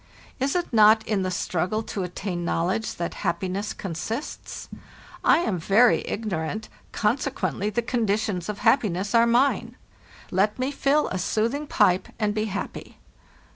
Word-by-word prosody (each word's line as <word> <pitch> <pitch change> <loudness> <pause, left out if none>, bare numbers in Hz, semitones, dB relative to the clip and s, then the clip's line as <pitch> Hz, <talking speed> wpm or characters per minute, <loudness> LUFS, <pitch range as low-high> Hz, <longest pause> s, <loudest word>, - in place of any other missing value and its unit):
Is 270 +4 0
it 350 -7 -1
not 220 0 +6
in 210 -3 +1
the 185 - -1
struggle 185 +4 -1
to 205 - -4
attain 180 0 -4
knowledge 180 +6 -1
that 170 - -3
happi 180 +2 -1
ness 200 +3 -3
consists? 205 - -5 0.6
I - - +6
am 195 - -1
very 215 +8 +4
ignorant, 210 -1 -3 0.2
consequently 210 - -1
the 235 +2 -1
conditions 215 -5 -1
of 210 - -3
happiness 200 -6 +2
are 235 0 +5
mine. 245 +4 +2 0.6
"Tet 205 +3 +2
me 255 +2 -1
fill 285 +1 +2
a 185 - -3
soothing 235 - -1
pipe 180 -7 +3
and 210 -2 0
be 215 0 -1
happy. 205 -1 -6
210 Hz, 145 wpm, -25 LUFS, 185-235 Hz, 0.6 s, not